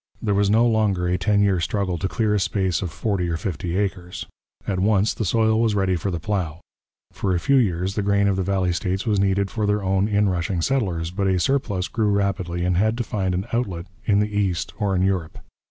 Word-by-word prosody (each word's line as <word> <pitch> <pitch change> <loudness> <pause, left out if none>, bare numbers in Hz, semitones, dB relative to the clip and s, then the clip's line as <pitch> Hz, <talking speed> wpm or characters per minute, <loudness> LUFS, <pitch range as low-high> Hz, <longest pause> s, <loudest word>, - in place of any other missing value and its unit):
There 105 -2 0
was 100 0 +2
no 110 +3 +4
longer 105 -6 +1
a 90 0 +1
ten 105 -1 +2
year 95 -3 +2
struggle 95 0 -1
to 95 - -1
clear 110 +1 0
a 105 - +2
space 95 -1 0
of 90 - -3
forty 90 -1 -1
or 85 - -1
fifty 85 0 -3
acres; 90 -3 -3 0.4
at 95 -2 -1
once 105 +1 +2
the - - -3
soil 110 +3 +2
was 110 -3 +2
ready 95 -2 +1
for 95 +3 -2
the 85 -3 -3
plough. 85 -4 -2 0.5
For 95 -3 -1
a - - +1
few 140 +9 +3
years 95 -5 +1
the 105 - -1
grain 100 0 +2
of 100 - +2
the 95 - -1
valley 95 -1 0
states 95 +2 -2
was 105 -3 +1
needed 100 0 +1
for 105 -2 -1
their 105 0 +1
own 95 +1 +1
inrushing 95 -4 0
settlers, 90 -11 -1
but 100 +1 -1
a 95 -1 +2
surplus 105 -5 0
grew 110 -3 0
rapidly 95 -4 -1
and 90 -1 +1
had 110 +4 +2
to 120 - -1
find 95 -4 -2
an 95 +2 -2
outlet 95 -8 -2 0.2
in 100 - +2
the 105 0 -1
east 95 -4 -1
or 100 -3 0
in 90 - +2
Europe. 95 -4 -1
100 Hz, 230 wpm, -23 LUFS, 90-105 Hz, 0.5 s, no